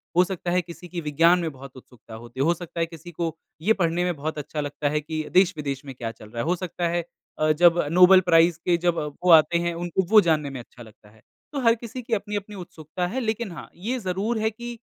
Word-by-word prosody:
हो 180 - +6
सकता 180 -2 -4
है 180 +1 +2
किसी 175 +1 -11
की 175 -1 -5
विज्ञान 165 +4 +3
में 165 -2 -2
बहुत 135 -1 -12
उत्सुकता 125 -3 -15
होते, 120 +3 -11
हो 165 +5 +3
सकता 175 0 -8
है 165 - +2
किसी 165 +1 -11
को 165 -1 -3 0.3
ये 210 +7 +3
पढ़ने 175 -3 0
में 180 -1 -1
बहुत 155 +2 -4
अच्छा 150 +1 -4
लगता 145 0 -2
है 150 +1 0
कि, 155 +1 -4
देश-विदेश 150 -7 +1
में 135 - -7
क्या 115 -2 -5
चल 110 -1 -15
रहा 115 +1 -4
है। - - -2
हो 180 - +3
सकता 175 -1 -3
है 170 0 -1 0.4
अ, 155 0 +3
जब 170 +2 +4
नोबेल 180 +2 +7
प्राइज़ 165 0 +5
के 175 -1 +3
जब 175 -1 +2 0.3
वो 180 - +2
आते 165 +1 +6
हैं, 170 0 -1
उनको 175 +2 -1
वो 220 0 +8
जानने 155 -5 +1
में 135 -2 -7
अच्छा 120 0 -13
लगता 110 -1 -18
है। 110 +1 -23 0.3
तो 290 - -3
हर 230 -2 +4
किसी 235 +2 -8
की 235 -1 -5
अपनी-अपनी 205 -1 -3
उत्सुकता 175 -1 -5
है। 235 +9 -3
लेकिन 225 -3 -2
हाँ, 160 -5 -9
ये 225 +9 -3
ज़रूर 200 +3 -2
है 220 0 +1
कि 240 +2 -7
170 Hz, 245 wpm, -24 LUFS, 150-185 Hz, 0.4 s, वो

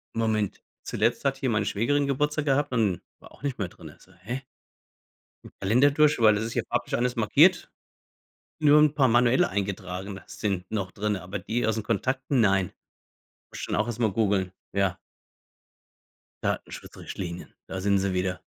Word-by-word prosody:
„Moment. 110 -3 0 0.2
Zuletzt 115 +6 0
hat 135 0 +1
hier 135 -1 -1
meine 105 -3 +1
Schwägerin 140 +8 +1
Geburtstag 150 +2 0
gehabt 145 0 +1
und 105 -7 +1 0.2
war - - -16
auch - - -19
nicht 140 -3 -2
mehr 100 - -1
drinnen.“ - - -13
So: 95 - -21
„Hä?“ 120 +8 -4 1.2
Kalender 120 +9 +4
durch, 150 -1 +3
weil 110 -2 +6
das 105 - -1
ist 115 - -4
ja - - +1
farblich - - -1
alles 125 +1 0
markiert. 110 -3 +4 0.9
Nur 150 -1 +6
'n 150 -1 +4
paar 135 -3 +4
manuell 120 +2 +4
eingetragene 95 -1 -4
sind 95 -3 -3
noch 100 -4 -2
drinne, 105 -2 -2
aber 95 +3 -5
die 115 +6 -1
aus 110 - +1
den 110 - -3
Kontakten, 130 +5 0
nein. 95 -4 +3 0.8
Muss - - -8
ich - - -3
dann - - -2
auch 105 +2 +1
erstmal 115 -2 0
googeln, 100 -3 +1 0.2
ja. 95 -2 0 1.5
Datenschutzrichtlinien. 90 -2 -5
Da 95 - -5
sind 100 +1 +3
sie 95 0 -1
wieder. 90 0 -1
110 Hz, 165 wpm, -26 LUFS, 95-130 Hz, 1.5 s, weil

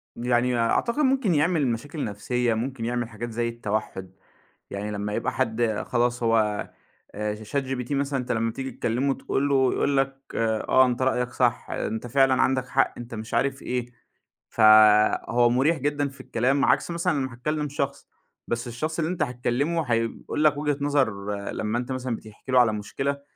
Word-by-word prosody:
يعني 120 0 +1
أعتقد 235 - +1
ممكن 260 - +2
يعمل 155 -2 +2
مشاكل 140 +6 -3
نفسية، 115 +3 -1
ممكن 115 +1 -3
يعمل 120 -1 -2
حاجات 120 +2 -6
زي 115 +1 -1
التوحّد. 105 -4 -4 0.6
يعني 100 +1 -4
لمّا 105 0 -3
يبقى - - -1
حد 115 -3 0
خلاص 120 0 0
هو 110 -2 +1 0.5
آآ، 105 0 -2
ش 125 - -10
chat - - +5
gpt 130 0 -4
مثلًا، 140 -1 0
أنت 125 - -3
لمّا 115 0 0
بتييجي 135 +2 -5
تكلّمه 125 +5 0
تقول 140 +1 -1
له 130 -2 +3
يقول 140 -1 +1
لك 135 0 0
آه، 115 +3 +3
أنت 125 0 -1
رأيك 125 -1 +1
صح، 120 -3 0
أنت 110 +3 -3
فعلًا 130 0 +3
عندك 130 -1 +1
حق، 135 +1 +1
أنت 120 -1 -8
مش 110 +1 -7
عارف 135 0 0
إيه. 125 -1 -3 0.6
فهو 110 +2 +5
مريح 140 +7 +2
جدًا 145 +1 -1
في 140 - -13
الكلام، 135 +4 +1
عكس - - +2
مثلًا 170 +1 0
ما 130 -4 -2
هتكلم 150 +4 -2
شخص، 140 0 -3 0.4
بس 120 +1 -2
الشخص 155 +8 -4
اللي 165 +2 0
أنت 180 - 0
هتكلمه 125 +7 -1
هيقول 115 +6 -1
لك 150 -1 +4
وجهة 145 -1 0
نَظَر 110 -9 0 0.2
لمّا 110 +2 -2
أنت 125 +2 -4
مثلًا 130 -2 -2
بتحكي 110 +4 -11
له 130 - +6
على 115 -3 +4
مشكلة. 135 +7 -3
125 Hz, 175 wpm, -25 LUFS, 115-140 Hz, 0.6 s, له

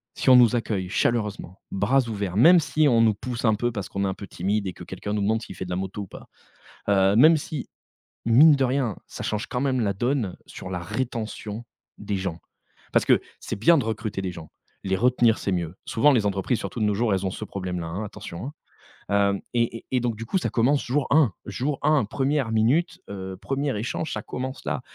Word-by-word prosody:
si - - +1
on 130 - +9
nous 120 0 +6
accueille 100 -6 -2
chaleureusement, 105 -4 -1
bras 115 +8 +2
ouverts, 100 -3 -3
même 170 +9 +8
si 155 -1 +2
on 115 -3 +4
nous 110 -2 +4
pousse 120 +3 -5
un 110 -2 +4
peu 120 +3 -1
parce 100 -4 -5
qu'on 100 0 -2
est - - +1
un 95 - -1
peu 100 - -9
timide, 100 +3 -1
et 90 - -4
que - - -11
quelqu'un 105 - -5
nous 105 - 0
demande 110 +3 +1
s'il 95 - -9
fait - - -5
de - - -9
la - - -1
moto 95 +2 -4
ou - - -10
pas. - - -12 0.6
Heu, 95 -1 +4
même 155 +7 +7
si, 145 -2 -6 0.6
mine 145 +7 +7
de 135 - +1
rien, 125 -5 0
ça - - -8
change 105 0 -2
quand 125 - -2
même 130 -2 +1
la 100 -3 +1
donne 120 -2 -1
sur - - -9
la 90 -2 -3
rétention 110 +1 -4 0.3
des 100 -1 -3
gens. 95 -3 -4 0.5
Parce - - +3
que - - +5 0.2
c'est - - -4
bien 165 +12 +5
de 135 - 0
recruter 110 -3 -3
des 95 - -2
gens. 80 -3 -10 0.3
Les 95 -1 +1
retenir, 120 0 +3
c'est 100 - -2
mieux. 85 -1 -2
Souvent 145 +6 +4
les 115 -5 +2
entreprises, 100 +4 0
surtout - - -6
de - - +2
nos 105 - +1
jours, 110 0 +1
elles 95 0 -1
ont 95 - 0
ce 110 - -6
problème 90 -3 -4
là, 85 - -5
hein, 95 +6 -4
attention, 105 -1 -8
hein. 145 - -6 0.6
Hem, 100 -1 +2
et 115 -1 0
et - - -18
et 130 - +1
donc 120 -2 -1
du 115 - -6
coup 190 - 0
ça - - -1
commence 135 +5 +2
jour 135 +3 0
1 140 - +4
jour 135 +8 -2
1, 150 -7 +3
1re 135 -1 0
minute, 155 +11 +2
heu, 95 -1 -6
1er 135 +4 -2
échange, 125 +7 -3
ça - - -4
commence 130 +1 -6
là. - - -2
110 Hz, 235 wpm, -25 LUFS, 100-130 Hz, 0.6 s, on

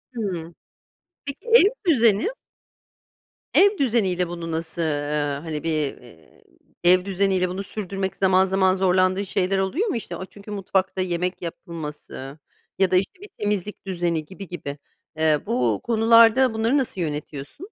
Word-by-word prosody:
Hı. 175 -7 -4 0.7
Peki, 280 - -7
ev 460 -3 +6 0.2
düzeni? 230 - +4 1.3
Ev 405 +1 +5
düzeniyle, 205 - +1
bunu 170 -1 -6
nasıl, 160 +1 -3
eee, 145 -2 -1
hani 155 -3 -5
bir, 165 - -1 0.3
eee, 100 -10 -19 0.4
ev 180 +1 +5
düzeniyle 190 -1 +1
bunu 185 +2 -4
sürdürmek 195 -1 -4
zaman, 190 -1 +3
zaman 190 0 +2
zorlandığın 185 +1 +2
şeyler 190 0 0
oluyor 260 - 0
mu? 270 - -1 0.2
O, 185 - -5
çünkü, 205 +2 -13
mutfakta 190 -1 -1
yemek 180 0 -2
yapılması, 155 -5 -7 0.4
ya 190 -2 +3
da, 185 - +3
işte, 190 - 0
bir 410 - -9
temizlik 205 -1 -2
düzeni 170 -4 -1
gibi 190 +3 -10
gibi. 145 -5 -6 0.4
Eee, 155 -1 +3
bu 120 -4 0
konularda, 230 +2 +5
bunları 225 +5 +1
nasıl 245 -9 -2
yönetiyorsun? 150 - -5
185 Hz, 140 wpm, -23 LUFS, 165-210 Hz, 1.3 s, ev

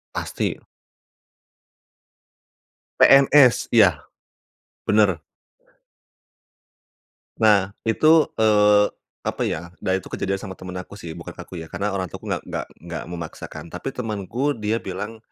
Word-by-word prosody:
Pasti. - - -2 2.5
PNS 135 -2 +6
iya, 90 -9 +6 0.9
benar. 105 -5 +3 2.2
Nah 105 -4 +5 0.2
itu, 155 +7 +4
eee, 105 -1 +5 0.4
apa - - -3
ya, 85 +2 -4
nah 95 - 0
itu 95 - -9
kejadian 95 0 -2
sama 95 -3 -8
temen 90 0 -8
aku 90 - -10
sih 85 -5 -8
bukan - - -8
aku 90 - -9
ya 80 - -7
karena 100 +5 -3
orang 95 -1 -2
tuaku - - -9
nggak - - -2
nggak - - -4 0.2
nggak 85 -2 -5
memaksakan, 80 -1 -7
tapi 90 +9 -4
temanku 120 +5 -2
dia 110 +1 -1
bilang 105 +4 -6
105 Hz, 120 wpm, -22 LUFS, 90-115 Hz, 2.5 s, PNS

